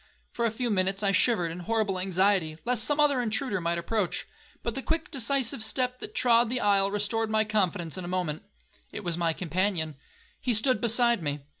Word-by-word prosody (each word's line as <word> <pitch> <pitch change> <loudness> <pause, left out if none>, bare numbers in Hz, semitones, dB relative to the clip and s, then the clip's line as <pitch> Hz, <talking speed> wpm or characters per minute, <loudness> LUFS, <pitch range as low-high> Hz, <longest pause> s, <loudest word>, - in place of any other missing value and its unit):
For 235 - -1
a - - -1
few 240 +1 -2
minutes 195 +1 0
I 200 - +3
shivered 185 -4 +2
in 170 - -7
horrible 210 0 -1
anxiety, 185 -3 +1
lest 240 -2 +2
some 290 0 0
other 285 -4 +4
intruder 220 -3 -1
might 170 0 -1
approach, 185 +2 -2 0.4
but 235 - -2
the 270 - -2
quick 325 +2 -2
decisive 265 -2 0
step 250 +2 -1
that - - -9
trod 235 -1 +4
the 255 +1 0
aisle 200 -3 +3
restored 210 +2 -1
my 215 0 +2
confidence 190 -6 -1
in - - -6
a - - -6
moment,—it 155 - -6
was 175 -2 -1
my 170 -1 +1
companion. 175 -2 -1 0.4
He 245 -3 0
stood 250 +4 +2
beside 235 -2 +3
me. 145 -2 -3
210 Hz, 190 wpm, -28 LUFS, 180-235 Hz, 0.4 s, other